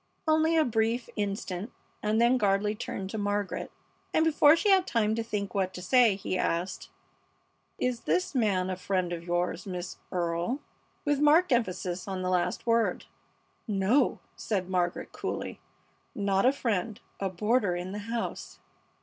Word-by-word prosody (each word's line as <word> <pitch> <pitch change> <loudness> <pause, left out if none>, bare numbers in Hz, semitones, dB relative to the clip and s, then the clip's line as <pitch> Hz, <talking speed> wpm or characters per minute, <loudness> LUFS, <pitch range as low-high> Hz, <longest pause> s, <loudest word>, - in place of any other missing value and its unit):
Only 315 +1 +3
a 315 - +4
brief 230 +1 0
instant 200 0 -3 0.3
and 215 +1 +1
then 240 +2 +4
Gardley 205 0 +2
turned 195 -2 -5
to 220 - -3
Margaret, 205 -1 -2 0.5
and 315 - +4
before 300 -1 +6
she 405 +4 +2
had 380 -1 +4
time 220 -2 +1
to 230 - -1
think 210 -3 -3
what 185 -2 -1
to 180 - -6
say, 240 0 +5
he 185 -1 -3
asked: 170 +3 -2 0.9
"Is 250 -2 -1
this 175 0 0
man 195 -7 +1
a - - -1
friend 180 -1 -1
of 170 -1 -5
yours, 175 +1 -1
Miss 180 -1 -5
Earle?" 175 +7 -1 0.5
with 290 -1 +2
marked 305 +4 +5
emphasis 185 -6 0
on 190 -1 -3
the 185 - 0
last 180 -1 0
word. 230 -1 +1 0.6
"No," 210 +6 +2 0.2
said 190 -4 -2
Margaret, 180 -1 -1
coolly, - - -4 0.6
"not 200 +1 +2
a - - +6
friend 220 -6 -2 0.2
a 195 - -1
boarder 205 +1 +1
in 180 +1 -4
the 205 - -4
house." 235 0 -4
205 Hz, 160 wpm, -29 LUFS, 185-240 Hz, 0.9 s, before